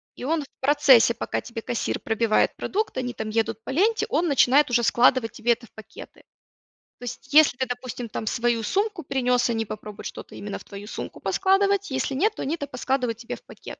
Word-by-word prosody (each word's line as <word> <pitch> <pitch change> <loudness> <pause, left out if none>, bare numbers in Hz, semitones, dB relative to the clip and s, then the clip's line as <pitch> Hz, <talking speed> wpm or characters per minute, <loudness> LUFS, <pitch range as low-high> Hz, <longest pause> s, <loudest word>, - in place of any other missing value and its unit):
и - - -9
он 310 +3 0
в 275 - -13
процессе, 265 -4 +5
пока - - -3
тебе 230 -1 -7
кассир 235 - -2
пробивает 225 0 +1
продукт, 430 -7 -2
они 245 -1 -2
там 220 -2 -5
едут 225 0 -1
по - - -9
ленте, 415 +11 +2
он 345 - +1
начинает 280 -1 +4
уже 240 - +3
складывать 235 0 +3
тебе 235 +1 0
это 235 0 -11
в - - -30
пакеты. 220 - -12 0.8
То - - -12
есть, 260 +3 -8
если 305 -4 +6
ты, 260 - 0
допустим, 245 -1 -5
там 220 0 -5
свою 235 0 +1
сумку 400 - -1
принёс, 250 -3 +1
они 225 -1 -1
попробуют 210 0 -8
что-то - - -8
именно 205 0 -6
в - - -14
твою 200 +1 -10
сумку 210 - -7
поскладывать, 395 0 +2
если 265 0 -2
нет, 410 +11 +1
то - - -5
они 285 - -1
это 285 -4 -6
поскладывают 250 -3 -1
тебе 230 0 -6
в - - -17
пакет. - - -11
250 Hz, 210 wpm, -24 LUFS, 230-290 Hz, 0.8 s, если